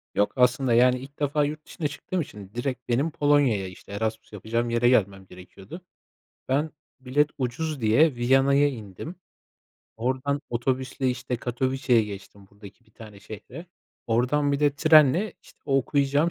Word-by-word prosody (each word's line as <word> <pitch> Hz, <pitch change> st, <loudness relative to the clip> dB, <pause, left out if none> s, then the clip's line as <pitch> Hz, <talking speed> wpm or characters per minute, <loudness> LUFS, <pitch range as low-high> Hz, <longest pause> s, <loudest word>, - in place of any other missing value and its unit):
Yok, 105 Hz, -, +1 dB
aslında, 125 Hz, 0 st, +2 dB
yani, 125 Hz, +2 st, +4 dB
ilk 140 Hz, +3 st, -13 dB
defa 145 Hz, 0 st, +1 dB
yurt 150 Hz, +1 st, -6 dB
dışına 155 Hz, -, -4 dB
çıktığım 175 Hz, +5 st, -4 dB
için 100 Hz, -9 st, -10 dB
direkt 125 Hz, +1 st, -4 dB
benim 135 Hz, +7 st, +1 dB
Polonya'ya, 145 Hz, -10 st, +2 dB
işte, 90 Hz, +2 st, -13 dB
Erasmus 110 Hz, +2 st, -4 dB
yapacağım 115 Hz, +4 st, -2 dB
yere 120 Hz, +1 st, +3 dB
gelmem 100 Hz, -5 st, +1 dB
gerekiyordu. 95 Hz, -, -12 dB, 0.7 s
Ben 145 Hz, +4 st, +1 dB, 0.3 s
bilet 140 Hz, +4 st, +1 dB
ucuz 135 Hz, +3 st, -3 dB
diye 135 Hz, +8 st, +4 dB
Viyana'ya 135 Hz, +4 st, +3 dB
indim. 115 Hz, -, -8 dB, 0.8 s
Oradan 130 Hz, +4 st, -1 dB
otobüsle, 130 Hz, +2 st, -1 dB
işte, 125 Hz, 0 st, -3 dB
Katowice'ya 125 Hz, +1 st, +1 dB
geçtim 100 Hz, -1 st, -10 dB
buradaki 105 Hz, +3 st, -15 dB
bir 110 Hz, -, -28 dB
tane 105 Hz, -3 st, -13 dB
şehre. 110 Hz, -, -10 dB, 0.4 s
Oradan 130 Hz, +5 st, +1 dB
bir 140 Hz, -, -1 dB
de 145 Hz, -1 st, +2 dB
trenle, 155 Hz, +5 st, +5 dB
işte, -, -, -20 dB
o 135 Hz, -2 st, +1 dB
okuyacağım 140 Hz, +4 st, +1 dB
130 Hz, 145 wpm, -25 LUFS, 115-145 Hz, 0.8 s, trenle